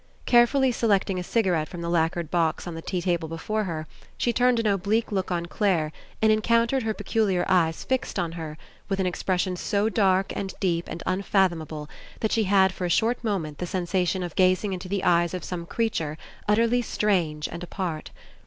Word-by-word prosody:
Carefully 255 +2 +4
selecting 200 -5 +1
a - - -3
cigarette 180 -7 +1
from 175 - -7
the 170 - -3
lacquered 170 -1 0
box 165 -2 +1
on 175 - -5
the 165 - -6
tea 180 +1 -3
table 175 -3 0
before 215 +6 -2
her, 160 -3 -4 0.3
she 240 - +1
turned 245 0 +3
an 230 - -1
oblique 205 +3 +1
look 190 -2 -1
on 175 -2 -1
Clare 170 -4 0 0.3
and 220 - +6
en 215 0 +3
countered 235 +3 +2
her 220 -2 -1
peculiar 200 -6 0
eyes 165 -3 +2
fixed 260 -1 -1
on 170 -2 -1
her 160 -2 -6 0.3
with 195 -1 -1
an 190 - +1
expression 180 0 -1
so 205 +4 0
dark 195 -3 +2
and 195 -1 -4
deep 170 -3 0
and 165 - -6
unfathom 190 -3 +1
able 150 -1 -7 0.3
that 220 - 0
she 220 -2 +2
had 190 -1 +4
for 185 - -4
a - - -1
short 235 +7 +1
moment 175 -9 -2
the 180 - -3
sen 185 -1 -2
sation 180 0 0
of 175 - -8
gazing 185 +2 +3
into 185 0 -6
the 200 0 -1
eyes 175 0 +3
of 180 - -5
some 170 -2 -5
creature 165 -10 -1 0.3
utterly 230 +3 +3
strange 175 -10 0
and 170 - -7
apart. 175 -3 -4
185 Hz, 200 wpm, -25 LUFS, 170-215 Hz, 0.3 s, and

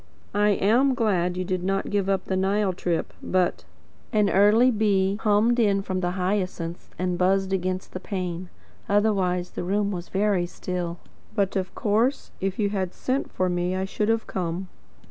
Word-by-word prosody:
"I 210 +1 +3 0.2
am 265 +2 +4
glad 180 -7 +1
you 185 - -2
did 185 -1 -2
not 195 +1 -1
give 200 -1 +1
up 195 -1 0
the 190 - -1
Nile 195 +1 +1
trip 175 -1 -2
but 185 -1 0 0.2
" - - -32
An 205 -1 +3
early 215 +6 +5
bee 200 -3 +2
hummed 220 +3 +3
in 200 -3 +3
from 185 -1 -2
the 175 -1 0
hyacinths 180 -3 -2
and 180 -1 -1
buzzed 190 +1 +2
against 185 0 -2
the 185 - -4
pane. 180 -2 -4 0.4
Otherwise 195 -4 +1
the - - -4
room 200 +3 0
was 175 -2 -5
very 195 -3 +1
still. 175 -1 -4 0.4
"but 200 -3 +1
of 190 -1 -2
course, 230 +5 +1
if 195 0 -1
you 205 -2 +1
had 190 -3 -2
sent 260 +2 -2
for 185 - 0
me 180 +1 0
I 190 0 -1
should 210 +2 -1
have 225 0 +1
come." 180 0 -3
190 Hz, 180 wpm, -25 LUFS, 180-205 Hz, 0.4 s, early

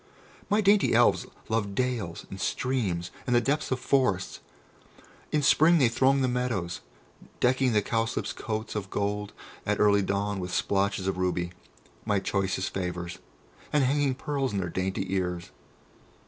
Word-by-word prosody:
My 210 +1 +3
dainty 200 0 +4
Elves - - +4 0.2
love 105 -3 -1
dales 115 -9 -2
and 95 - -6
streams, 100 -10 -1 0.2
and 125 - +2
the - - +6
depths 145 +5 0
of 130 - -1
forests; 120 -9 +1 0.9
in 150 -1 +1
spring 160 +5 +5
they 130 -6 +4
throng 135 +3 +3
the - - +3
meadows, 125 -9 -2 0.6
decking 130 0 +3
the 105 -1 +3
cowslips' 115 +1 -1
coats 110 -1 -4
of 100 -3 -4
gold 105 +1 -2 0.3
at 105 0 -1
early 100 -1 +5
dawn 100 +1 -1
with 90 0 -4
splotches 100 0 0
of 95 -1 -1
ruby, 90 -1 0 0.5
my 105 -2 +1
choicest 95 -1 -1
favours, 90 -2 -4 0.5
and 150 -2 +3
hanging 140 0 +2
pearls 135 -2 -2
in - - -1
their 90 -2 -1
dainty 95 +2 -2
ears. 90 -1 -2
105 Hz, 150 wpm, -28 LUFS, 95-130 Hz, 0.9 s, the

